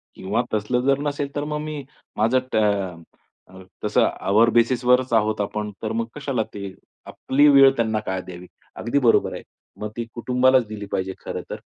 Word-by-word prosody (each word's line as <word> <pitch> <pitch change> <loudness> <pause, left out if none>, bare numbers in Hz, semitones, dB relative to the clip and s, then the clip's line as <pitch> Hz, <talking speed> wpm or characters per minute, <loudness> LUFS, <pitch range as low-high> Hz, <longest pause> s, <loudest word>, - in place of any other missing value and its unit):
किंवा 105 +5 -1
तसलं 110 +4 0
जर 135 +2 +2
नसेल, 145 0 -2
तर 145 - -1
मग 150 0 -3
मी 150 -2 -5 0.3
माझं 115 +4 +3
त - - 0 0.9
अ, 95 0 -14 0.2
तसं - - +3 0.2
आवर 110 +4 +5
बेसिसवरच 125 +1 +3
आहोत 110 -1 +2
आपण 105 +1 -3
तर 110 - -2
मग 115 0 -1
कशाला 140 -6 -2
ते 100 -2 -6 0.3
आपली 145 +3 +2
वेळ 135 -1 +7
त्यांना 110 -2 0
काय 95 -1 -2
द्यावी. 90 -1 -10 0.3
अगदी 120 +5 0
बरोबर 120 -4 +3
आहे. - - -6 0.4
मग 105 - -4
ती 120 - -2
कुटुंबालाच 125 +1 +3
दिली 105 -1 -7
पाहिजे 95 0 -2
खरंतर. - - -6
115 Hz, 170 wpm, -23 LUFS, 105-130 Hz, 0.9 s, वेळ